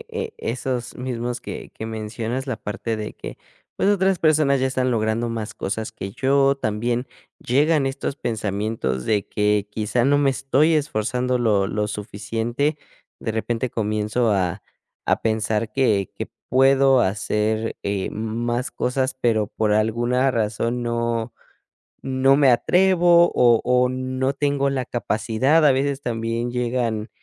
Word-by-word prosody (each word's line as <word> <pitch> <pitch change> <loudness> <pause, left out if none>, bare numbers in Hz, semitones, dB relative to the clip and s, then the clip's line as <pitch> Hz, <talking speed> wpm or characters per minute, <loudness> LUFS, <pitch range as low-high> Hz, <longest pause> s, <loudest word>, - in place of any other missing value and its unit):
eh 455 - -13
eh, 460 0 -5
esos 125 0 -3
mismos 125 -1 -3
que - - -8
que 110 - -6
mencionas, 115 +4 -4
la 130 -4 -2
parte 110 +1 -4
de 105 0 -6
que, - - -9 0.4
pues, - - +1
otras 195 -2 +2
personas 150 -4 +3
ya 130 - +2
están 130 -1 0
logrando 115 +1 0
más 110 -1 -4
cosas 110 +3 -4
que 95 - -6
yo, 135 +4 +2
también 120 +2 -1 0.3
llegan 145 +3 +2
estos 135 +1 -3
pensamientos 105 - -2
de 105 -2 +1
que, 105 0 +1
quizá, 110 +3 0
no 145 +1 +4
me 140 -1 +3
estoy 135 +4 +2
esforzando 125 -3 0
lo 105 -5 +2
lo 105 +1 -2
suficiente, 115 +8 -2 0.4
de 110 - -3
repente, 115 +2 -2
comienzo 110 +2 0
a 95 -4 0 0.4
a - - +2
pensar 110 0 0
que 105 -7 +1
que - - -5 0.2
puedo 135 0 +5
hacer, 105 +3 -1
eh, 100 -1 -2
m 105 - -5
más 120 +1 -1
cosas, 130 +1 -1
pero, 110 -4 +1
por 110 0 -1
alguna 120 +5 +2
razón, 115 +1 -1
no 115 -1 -1 0.7
no 135 +1 +3
me 140 -2 +5
atrevo 175 +6 +4
o 120 -2 +5
o 125 0 +3
no 130 +1 -2
tengo 140 -1 0
la 130 -2 -2
capacidad. 120 +7 +1
A 145 - +6
veces, 135 +1 0
también 115 0 -2
llegan 120 -3 -1
120 Hz, 150 wpm, -22 LUFS, 110-135 Hz, 0.7 s, A